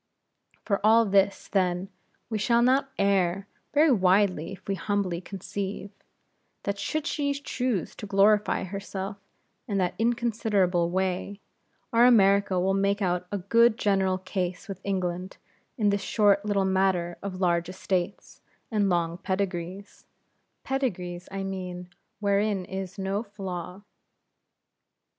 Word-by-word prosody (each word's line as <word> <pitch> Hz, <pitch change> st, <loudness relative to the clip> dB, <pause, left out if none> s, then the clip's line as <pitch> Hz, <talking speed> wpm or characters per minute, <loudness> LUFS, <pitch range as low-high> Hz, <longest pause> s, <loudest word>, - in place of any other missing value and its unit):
For 200 Hz, -2 st, 0 dB
all 225 Hz, +2 st, +6 dB
this, 195 Hz, -1 st, +2 dB
then, 185 Hz, -1 st, 0 dB, 0.4 s
we 220 Hz, -2 st, -2 dB
shall 235 Hz, +2 st, +3 dB
not 270 Hz, +2 st, +3 dB
err 195 Hz, -1 st, +1 dB, 0.2 s
very 300 Hz, +1 st, +5 dB
widely 185 Hz, -5 st, +3 dB
if 190 Hz, -, -11 dB
we 200 Hz, -, 0 dB
humbly 190 Hz, -2 st, -1 dB
conceive, 195 Hz, +1 st, -5 dB, 0.7 s
that 200 Hz, 0 st, -2 dB
should 310 Hz, +5 st, -2 dB
she 285 Hz, -2 st, 0 dB
choose 250 Hz, -, -2 dB
to 210 Hz, -, -7 dB
glorify 205 Hz, +2 st, +3 dB
herself 195 Hz, +1 st, -5 dB, 0.5 s
in 205 Hz, -4 st, -1 dB
that 180 Hz, -2 st, +1 dB
inconsiderable 220 Hz, -7 st, +1 dB
way 190 Hz, +2 st, -2 dB, 0.5 s
our 235 Hz, +1 st, +6 dB
America 200 Hz, -4 st, +4 dB
will 190 Hz, +2 st, +1 dB
make 200 Hz, +1 st, +1 dB
out 180 Hz, -2 st, -1 dB
a 205 Hz, -, -1 dB
good 230 Hz, +4 st, +4 dB
general 190 Hz, -3 st, +2 dB
case 185 Hz, 0 st, -4 dB
with 195 Hz, -, -7 dB
England 185 Hz, -1 st, -3 dB, 0.4 s
in 210 Hz, -3 st, +3 dB
this 200 Hz, 0 st, 0 dB
short 200 Hz, -1 st, +3 dB
little 205 Hz, -2 st, +1 dB
matter 190 Hz, -2 st, +1 dB
of 190 Hz, -2 st, -5 dB
large 170 Hz, -2 st, +1 dB
estates, 185 Hz, 0 st, -3 dB, 0.3 s
and 205 Hz, -3 st, +2 dB
long 170 Hz, -1 st, 0 dB
pedigrees 190 Hz, 0 st, -4 dB, 0.6 s
pedigrees 180 Hz, -10 st, -3 dB
I 195 Hz, 0 st, -3 dB
mean, 180 Hz, -2 st, -5 dB, 0.3 s
wherein 200 Hz, -1 st, +1 dB
is 190 Hz, +1 st, -6 dB
no 195 Hz, +1 st, -1 dB
flaw. 190 Hz, -3 st, -7 dB
195 Hz, 130 wpm, -27 LUFS, 185-210 Hz, 0.7 s, all